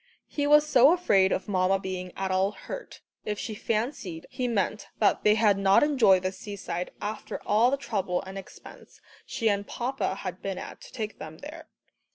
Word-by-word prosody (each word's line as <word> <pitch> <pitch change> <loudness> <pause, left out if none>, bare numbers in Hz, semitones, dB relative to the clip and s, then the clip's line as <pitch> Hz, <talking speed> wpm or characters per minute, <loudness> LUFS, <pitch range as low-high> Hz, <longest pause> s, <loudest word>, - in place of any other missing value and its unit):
He 290 -1 -1
was 300 +1 +6
so 275 +2 +6
afraid 195 - +3
of - - -1
Mamma 190 -1 +2
being 185 -1 -5
at 190 0 -2
all 190 +2 +1
hurt, - - -9 0.2
if 210 -1 -3
she 220 - -4
fancied 215 - -3
he 250 - -2
meant 210 -2 -1
that 210 - +2
they 210 0 +5
had 210 -3 +3
not 195 +4 +5
enjoyed 235 -11 +4
the 185 - 0
seaside 185 -3 -5
after 210 +1 -5
all 220 +4 +4
the 275 - 0
trouble 195 -9 -2
and 190 +1 -9
expense 195 -1 -12 0.3
she 225 - -1
and 200 -1 +1
papa 250 -5 -2
had 185 -2 -6
been 195 -1 -3
at - - -8
to - - -13
take 215 -3 -5
them 155 0 -8
there. 300 +2 -10
205 Hz, 190 wpm, -27 LUFS, 190-240 Hz, 0.3 s, was